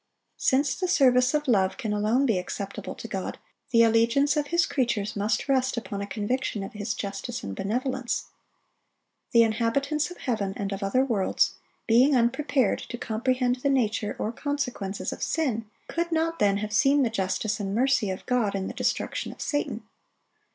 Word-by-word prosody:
Since 270 +1 +2
the 370 - -1
service 260 -5 +4
of 295 -1 -1
love 190 -5 +2
can 215 -2 -2
alone 215 +6 +2
be 220 -8 +2
acceptable 195 +2 -5
to - - -8
God, - - -4 0.3
the 230 -3 +5
allegiance 230 +6 +3
of 295 -1 0
His 340 +2 +2
creatures 235 -7 -1
must 210 +4 0
rest 260 -2 +1
upon 205 -3 -4
a 200 - -4
conviction 210 +2 -2
of 195 - -7
His 210 +1 -3
justice 200 +4 -5
and 100 -1 -5
benevolence. 250 - -2 1.1
The 235 -1 +6
inhabitants 245 +8 0
of 355 - -10
heaven 205 -6 -2
and 200 -1 -3
of 195 +1 -4
other 225 +7 +2
worlds, 215 -7 +1 0.3
being 255 +5 +5
unprepared 255 0 +2
to 240 - -7
comprehend 250 +3 0
the 280 +3 0
nature 220 -5 0
or 215 - -2
consequences 250 -7 -3
of - - -10
sin, 235 -9 -1 0.2
could 340 0 -2
not 330 0 0
then 200 -1 +3
have 210 +1 -4
seen 275 +4 +4
the 235 - 0
justice 205 +1 -1
and 195 -1 -2
mercy 255 -3 +2
of 190 - -5
God 240 -6 +1
in 190 -1 -2
the - - -5
destruction - - -2
of - - -14
Satan. 290 -7 -2
235 Hz, 175 wpm, -26 LUFS, 205-270 Hz, 1.1 s, The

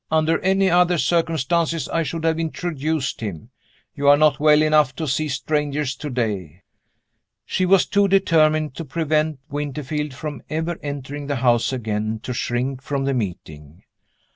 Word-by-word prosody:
Under 160 +1 +2
any 190 +1 +2
other 175 0 +3
circumstances, 165 0 0
I 165 - 0
should 160 +1 -4
have 165 0 +1
introduced 160 -4 -2
him. 105 +2 -6 0.4
You 140 -1 -2
are 145 0 +8
not 150 -2 +3
well 150 0 +5
enough 155 -3 +3
to 160 - -3
see 155 +3 0
strangers 145 -1 -1
today." 105 - -4 0.8
She 185 -1 0
was 190 0 +5
too 200 0 +2
determined 155 -6 +3
to 165 - -4
prevent 155 0 -1
Winterfield 145 0 -3
from 145 -3 -6
ever 160 +2 -2
entering 145 0 -6
the 145 - -1
house 120 -1 +2
again 110 -3 -2
to 125 - -4
shrink 125 +2 -2
from 140 -1 -2
the 140 - +1
meeting. 85 - -6
150 Hz, 150 wpm, -22 LUFS, 130-160 Hz, 0.8 s, are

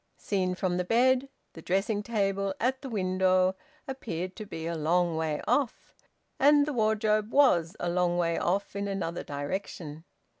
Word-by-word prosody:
Seen 185 -3 -1
from 180 -1 -1
the 180 - 0
bed, 255 +6 +3 0.2
the 165 - -10
dressing 195 +5 0
table, 195 -3 -1
at 260 +3 0
the 270 - -6
window, 185 -2 +2 0.3
appeared 185 -9 -5
to 215 -2 -7
be 160 -4 -6
a 170 - -2
long 170 +2 +1
way 160 -2 -2
off, 250 +1 0 0.5
and 290 +1 +6
the 300 - -3
wardrobe 215 -1 +1
was 180 - +4
a 175 - -2
long 175 0 +1
way 170 -1 +1
off 195 +3 -1
in 200 0 -2
another 190 -4 -3
direction. 150 +1 -5
190 Hz, 160 wpm, -28 LUFS, 175-220 Hz, 0.5 s, and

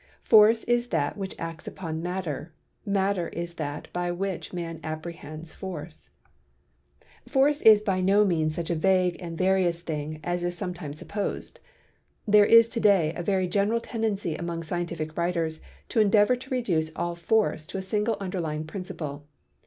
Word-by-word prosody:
Force 220 +1 +6
is 240 0 +1
that 145 -11 0
which 195 -2 -5
acts 165 -1 -6
upon 160 -3 -5
Matter, 175 -3 -4 0.4
Matter 195 -3 +1
is 170 0 -5
that 145 0 -4
by 175 0 -1
which 185 +1 -3
man 165 -2 -5
apprehends 155 0 -7
Force. 175 -4 -8 1.2
Force 285 +2 +3
is 215 -2 +8
by 190 -3 0
no 200 +3 +4
means 160 -4 +1
such 170 0 -3
a - - +1
vague 180 +1 +2
and 170 -2 -6
various 185 -2 +2
thing 155 -2 -4
as 175 +1 -2
is 175 0 -2
sometimes 175 -6 -5
supposed. 205 +5 -4 0.7
There 205 0 +6
is 230 0 +8
to 230 - -3
day 190 -8 +4
a 175 - -3
very 185 +1 +1
general 205 +5 +1
tendency 220 -7 -2
among 170 0 -4
scientific 165 -2 -4
writers 170 -2 -1 0.3
to - - +1
endeavor 210 +3 +5
to 260 +1 -11
reduce 175 -12 0
all 175 0 -2
force 170 -2 0
to - - -5
a 190 - -3
single 210 +3 0
underlying 170 -6 -3
principle. 155 -5 -6
175 Hz, 160 wpm, -27 LUFS, 165-200 Hz, 1.2 s, is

